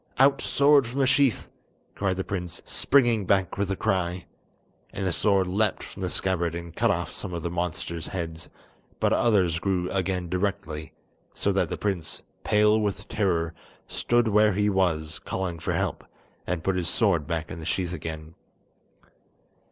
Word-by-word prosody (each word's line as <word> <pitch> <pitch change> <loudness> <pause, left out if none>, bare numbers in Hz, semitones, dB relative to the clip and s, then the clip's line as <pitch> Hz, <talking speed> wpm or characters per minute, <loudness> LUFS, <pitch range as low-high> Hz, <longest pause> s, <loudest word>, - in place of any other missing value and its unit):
"Out 135 +2 +5
sword 140 -2 +4
from 125 +3 -6
the 135 - +3
sheath," 135 -2 +2 0.4
cried 95 -2 -1
the 95 - -1
prince, 90 -3 -3
springing 120 -8 +2
back 95 -1 +2
with 100 -1 0
a 95 - 0
cry. 95 -4 -1 0.7
And 95 - -4
the 90 - +1
sword 95 +3 +3
leapt 100 +3 0
from - - -9
the - - -1
scabbard 85 -3 -1
and 85 -1 -7
cut - - +2
off - - -1
some 90 - -5
of 85 - -4
the 85 - -2
monster's 85 -1 -3
heads, 80 -3 -5 0.5
but - - +2
others 95 -8 +3
grew 90 -1 -1
again 95 -2 -1
directly, 85 -4 -3 0.4
so - - +1
that - - +1
the - - -3
prince, 90 -6 -3 0.2
pale 105 +1 +4
with 105 -2 -2
terror, 85 -6 0 0.3
stood 120 -1 +1
where 105 -1 +4
he 105 +2 +2
was, 80 -5 0
calling 90 -3 -3
for - - -2
help, - - -1 0.4
and 85 -2 -2
put 95 +1 +1
his 85 -3 -1
sword 85 -10 +2
back 80 -2 -3
in - - -6
the 80 - -7
sheath 90 -1 -1
again. 80 -1 -6
95 Hz, 170 wpm, -26 LUFS, 85-105 Hz, 0.7 s, Out